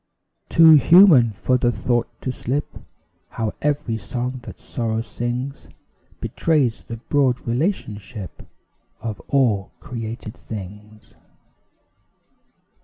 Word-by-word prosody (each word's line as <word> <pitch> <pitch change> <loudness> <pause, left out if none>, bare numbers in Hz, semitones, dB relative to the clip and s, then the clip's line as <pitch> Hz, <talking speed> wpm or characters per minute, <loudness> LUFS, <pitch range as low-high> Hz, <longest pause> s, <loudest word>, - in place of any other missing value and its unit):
Too 165 -1 +7
human 165 - +7
for 120 +5 0
the 120 -1 +2
thought 120 0 0
to 130 - -2
slip 135 +3 -2 0.6
How 110 -2 -3
every 145 -6 -1
song 125 +2 -4
that - - -9
sorrow 115 -2 -3
sings 120 +4 -4 0.5
Betrays 145 -8 0
the 115 - -6
broad 130 +1 +1
relationship 115 - -3 0.6
Of 110 -3 -5
all 115 -9 +2
created 115 -4 -6
things. 105 +1 -10
120 Hz, 100 wpm, -22 LUFS, 110-135 Hz, 0.6 s, Too